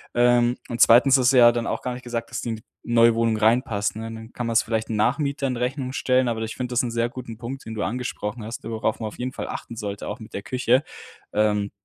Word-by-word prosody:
Ähm, 120 0 +4
und 120 -1 -2
2. 130 +4 +7
ist 125 -2 +2
es - - +6
ja 120 -2 +8
dann 120 -1 -2
auch - - -2
gar 125 - -2
nicht 125 - -8
gesagt, 115 -1 -4
dass 125 - -3
die - - -4
in 115 - -1
die 110 - -16 0.2
neue 115 0 +5
Wohnung 115 -1 +1
reinpasst, 110 -1 +1
ne? 115 +1 -6
Dann 110 0 -10
kann 120 - -3
man 115 - -1
es 115 - +4
vielleicht 110 -1 -2
Nachmietern 135 +5 0
in - - -4
Rechnung 130 +1 -2
stellen, 130 -1 +2
aber 115 -1 -1
ich 110 0 -4
finde 125 -1 -4
das 120 - +2
ist - - +3
'n 120 - -3
sehr 115 0 0
guten 120 -3 -8
Punkt, 125 +4 -7
den 110 - -6
du 105 - -2
angesprochen 115 -2 -4
hast, 115 +2 -7
worauf 110 0 -2
man 110 - -3
auf 105 - -10
jeden 125 +1 -3
Fall - - -5
achten 115 - -6
sollte, 100 -2 -5
auch 105 - -5
mit 110 - -12
der 100 - -4
Küche, 125 +4 +1 0.5
ähm, 105 -1 +1
115 Hz, 270 wpm, -24 LUFS, 110-125 Hz, 0.5 s, ja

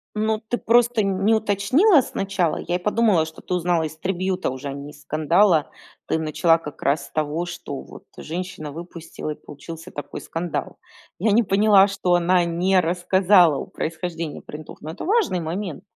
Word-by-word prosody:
Ну 215 0 0
ты 240 - -1
просто, 235 0 +3
не 195 +2 +1
уточнила 225 - +4
сначала. 195 -7 -1
Я 175 - -2
и - - +2
подумала, 210 -3 +2
что 160 0 -11
ты - - -13
узнала 175 -1 +1
из 155 0 -5
трибьюта 185 0 -2
уже, 130 +2 -6
а 135 - -4
не 140 +1 -8
из 145 - -17
скандала. 155 +3 +2 0.4
Ты 160 - 0
начала 165 +1 +2
как 150 -3 -9
раз 140 0 +1
с - - -21
того, 155 +3 -2
что 140 -5 -6
вот - - -13
женщина 165 -2 -6
выпустила 165 -1 -7
и - - -5
получился 165 +4 -10
такой 145 - -7
скандал. 165 0 -4 0.4
Я 210 +3 +1
не 230 +4 +5
поняла, 200 -1 +5
что 195 -3 0
она 175 0 +3
не 180 +3 +2
рассказала 180 0 +4
о - - -4
происхождении 165 -1 -5
принтов. 150 0 -10
Но 155 - -6
это - - -8
важный 395 - +1
момент. 170 0 -4
175 Hz, 175 wpm, -23 LUFS, 160-195 Hz, 0.4 s, не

